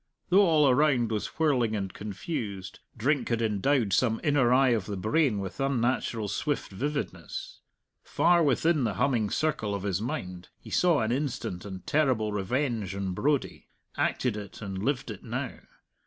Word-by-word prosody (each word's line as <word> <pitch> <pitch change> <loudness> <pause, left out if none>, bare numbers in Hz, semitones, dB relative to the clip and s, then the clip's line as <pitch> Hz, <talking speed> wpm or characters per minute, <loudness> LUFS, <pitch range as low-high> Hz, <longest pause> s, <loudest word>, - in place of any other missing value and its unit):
Though 195 +2 +6
all 155 -3 +4
around 130 -4 +3
was 105 -2 -3
whirling 130 -9 +2
and 95 -3 -3
confused, 100 - -5 0.2
drink 130 +3 +1
had 115 -1 +1
endowed 110 0 +1
some 115 +1 +2
inner 140 -5 +3
eye 130 +1 +5
of 110 -6 0
the 100 -2 -4
brain 110 - +2
with 95 +4 -5
unnatural 125 -4 0
swift 145 +7 -2
vividness. 95 - -4 0.4
Far 175 0 +3
within 155 +1 +2
the 115 - -1
humming 120 -7 +1
circle 110 -10 -1
of 100 - -5
his 100 -1 -1
mind 90 -6 -5
he - - -13
saw 175 -7 +3
an 110 +1 0
instant 125 -9 -3
and 95 -2 -8
terrible 130 -8 +1
revenge 110 -1 -1
on 95 -2 -2
Brodie, 145 +7 -1 0.3
acted 125 -5 0
it, 105 -2 -8
and 95 -2 -5
lived 130 -2 -1
it 100 - -9
now. - - -4
115 Hz, 160 wpm, -28 LUFS, 100-140 Hz, 0.4 s, Though